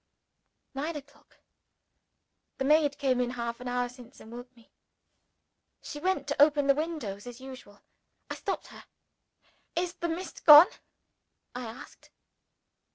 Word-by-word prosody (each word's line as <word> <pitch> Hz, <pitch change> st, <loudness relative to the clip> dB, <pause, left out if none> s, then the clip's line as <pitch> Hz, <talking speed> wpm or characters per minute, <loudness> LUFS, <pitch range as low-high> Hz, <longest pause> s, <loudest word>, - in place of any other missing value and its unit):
Nine 300 Hz, +4 st, -3 dB
o'clock. 285 Hz, 0 st, -13 dB, 1.2 s
The 270 Hz, -, -2 dB
maid 295 Hz, -1 st, +3 dB
came 260 Hz, -3 st, +1 dB
in 245 Hz, -, -1 dB
half 235 Hz, -1 st, -4 dB
an 250 Hz, -, -8 dB
hour 245 Hz, 0 st, -1 dB
since, 245 Hz, +1 st, -15 dB
and 220 Hz, -, -13 dB
woke 245 Hz, +1 st, -11 dB
me. 230 Hz, -, -22 dB, 1.1 s
She 295 Hz, -, -7 dB
went 365 Hz, -4 st, -1 dB
to 285 Hz, -, 0 dB
open 290 Hz, -1 st, +5 dB
the 275 Hz, -, +5 dB
window 300 Hz, -10 st, -4 dB
as 245 Hz, +4 st, -11 dB
usual. 255 Hz, -6 st, -12 dB, 0.4 s
I -, -, -5 dB
stopped -, -, -4 dB
her. -, -, -13 dB, 0.9 s
"Is 350 Hz, +1 st, -1 dB
the 340 Hz, -1 st, -4 dB
mist 345 Hz, +3 st, -6 dB
gone?" 300 Hz, +1 st, +11 dB, 0.9 s
I 250 Hz, 0 st, -6 dB
asked. 225 Hz, +2 st, -12 dB
270 Hz, 140 wpm, -29 LUFS, 245-300 Hz, 1.2 s, gone